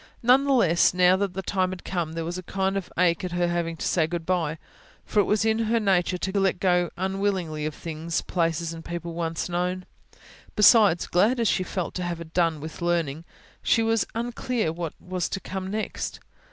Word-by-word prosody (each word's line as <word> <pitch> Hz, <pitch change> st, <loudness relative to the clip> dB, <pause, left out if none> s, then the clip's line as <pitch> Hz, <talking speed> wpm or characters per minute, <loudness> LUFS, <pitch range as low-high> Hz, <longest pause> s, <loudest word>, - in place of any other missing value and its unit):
None 255 Hz, +4 st, +5 dB
the 280 Hz, -, +1 dB
less, 175 Hz, -9 st, +4 dB
now 180 Hz, 0 st, +5 dB
that 195 Hz, -2 st, -2 dB
the 190 Hz, -, -3 dB
time 185 Hz, 0 st, 0 dB
had 185 Hz, -1 st, -7 dB
come 170 Hz, -4 st, -3 dB
there 165 Hz, 0 st, -3 dB
was 175 Hz, +2 st, -4 dB
a -, -, -6 dB
kind 190 Hz, +1 st, -1 dB
of 195 Hz, -3 st, -4 dB
ache 170 Hz, -1 st, +2 dB
in 180 Hz, -, -2 dB
her 175 Hz, 0 st, 0 dB
at 175 Hz, -, +1 dB
having 165 Hz, -1 st, -2 dB
to -, -, -4 dB
say 160 Hz, -3 st, +2 dB
good 170 Hz, 0 st, -4 dB
bye; 165 Hz, -4 st, 0 dB, 0.5 s
for 210 Hz, -, +1 dB
it 200 Hz, -, +4 dB
was 215 Hz, +1 st, +1 dB
in 220 Hz, 0 st, +2 dB
her 230 Hz, +1 st, +1 dB
nature 185 Hz, -3 st, +2 dB
to 190 Hz, +2 st, -1 dB
let 195 Hz, -1 st, +1 dB
go 180 Hz, -2 st, +2 dB
unwillingly 190 Hz, -5 st, -1 dB
of 155 Hz, -, -6 dB
things, 165 Hz, 0 st, -3 dB
places 165 Hz, -1 st, -1 dB
and 165 Hz, 0 st, -9 dB
people 170 Hz, 0 st, -5 dB
once 165 Hz, -1 st, -2 dB
known. 180 Hz, +1 st, -2 dB, 0.7 s
Besides, 210 Hz, -4 st, +6 dB
glad 220 Hz, +8 st, +2 dB
as 230 Hz, -, +2 dB
she -, -, +1 dB
felt 185 Hz, -1 st, -3 dB
to 180 Hz, -, -3 dB
have 170 Hz, -2 st, -5 dB
done 165 Hz, -3 st, +2 dB
with 160 Hz, +4 st, -8 dB
learning, 165 Hz, -3 st, -1 dB, 0.4 s
she 225 Hz, -, +3 dB
was 225 Hz, -1 st, +1 dB
unclear 235 Hz, -5 st, -1 dB
what 165 Hz, -2 st, -4 dB
was 180 Hz, -1 st, -3 dB
to 195 Hz, -, -3 dB
come 190 Hz, 0 st, -5 dB
next. 215 Hz, +1 st, -4 dB
180 Hz, 210 wpm, -25 LUFS, 170-195 Hz, 0.7 s, Besides